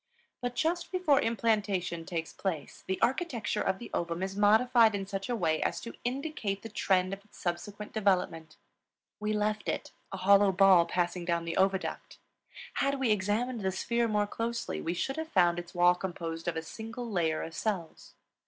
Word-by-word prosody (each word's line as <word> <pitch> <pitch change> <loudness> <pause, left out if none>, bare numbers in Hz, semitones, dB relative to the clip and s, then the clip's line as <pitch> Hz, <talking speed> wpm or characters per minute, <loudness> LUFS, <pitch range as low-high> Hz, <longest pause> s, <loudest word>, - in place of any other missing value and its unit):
But 245 0 -3
just 340 +4 0
before 360 -7 +3
implantation 205 -7 0
takes 165 -3 -4
place 165 -7 -4
the 190 0 -1
architecture 240 -4 0
of 190 - 0
the 240 - -9
ovum 170 +1 -2
is 195 0 -3
modified 220 +2 +5
in 195 -1 -3
such 195 +1 -4
a 245 - +1
way 160 -7 +1
as - - 0
to 235 - -7
indicate 245 -6 -3
the 225 - -6
trend 185 -2 +1
of 195 0 -7
its 210 - -20
subsequent 200 +4 -4
development. 180 -7 0 0.6
We 210 0 -1
left 210 0 0
it, - - -3 0.2
a 195 - -4
hollow 200 +1 +5
ball 185 -3 +6
passing 175 0 -1
down 170 -1 -1
the 165 0 -3
oviduct; 190 0 0 0.6
had 275 0 +1
we 255 -4 +2
examined 215 +4 0
the 190 -1 0
sphere 235 +5 0
more 210 -1 +1
closely 230 +3 -3
we 170 +2 -2
should 270 - -2
have 320 0 -4
found 175 - +3
its 175 0 -10
wall 175 0 +6
composed 170 -2 -5
of 170 -1 -1
a 160 - -3
single 225 +7 -7
layer 170 -7 0
of 165 - -7
cells. 185 -4 -4
200 Hz, 180 wpm, -30 LUFS, 175-230 Hz, 0.6 s, ball